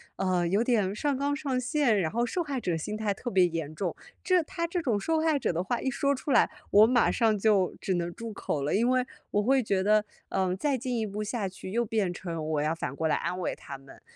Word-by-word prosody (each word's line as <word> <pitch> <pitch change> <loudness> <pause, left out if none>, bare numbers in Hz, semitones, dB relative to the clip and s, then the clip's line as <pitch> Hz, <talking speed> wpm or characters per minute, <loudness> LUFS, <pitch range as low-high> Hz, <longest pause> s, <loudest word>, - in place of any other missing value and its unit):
呃， 185 -2 +1
有 200 +6 +2
点 210 -6 +1
上 285 +5 0
纲 285 +1 0
上 275 -3 -1
线， 255 -4 +2
然 165 -4 0
后 235 +4 +1
受 350 +9 -2
害 280 -4 -3
者 175 -5 0
心 185 +6 -4
态 215 -2 0
特 240 +5 -5
别 190 -4 +4
严 165 -3 -3
重。 175 0 -2 0.3
这 365 -1 +3
他 335 +2 -3
这 340 +1 -2
种 235 -8 0
受 320 +9 0
害 315 -2 +2
者 - - 0
的 170 +2 -1
话 235 +6 -1
一 265 - 0
说 280 +2 +1
出 275 +2 -4
来， 245 - +5 0.2
我 210 +2 +7
马 245 -1 +3
上 220 -3 +2
就 200 -3 +2
只 190 - -1
能 175 0 -2
住 230 +2 -7
口 150 -7 -3
了， 145 - 0
因 235 +4 +2
为 255 0 +2 0.3
我 205 0 +1
会 265 +3 +3
觉 195 -5 0
得， 210 +1 +4 0.3
嗯， 185 -1 0
再 280 +7 +1
进 250 0 -3
一 220 - 0
步 210 +1 -4
下 210 -1 -2
去， 185 0 -9
又 235 +3 +1
变 210 -4 0
成 170 -3 -5
我 155 -2 0
要 155 +2 +1
反 140 -5 -4
过 160 +2 0
来 - - +2
安 180 - -2
慰 180 - -1
他 140 - -9
们。 135 0 -16
215 Hz, 275 characters per minute, -28 LUFS, 180-255 Hz, 0.3 s, 我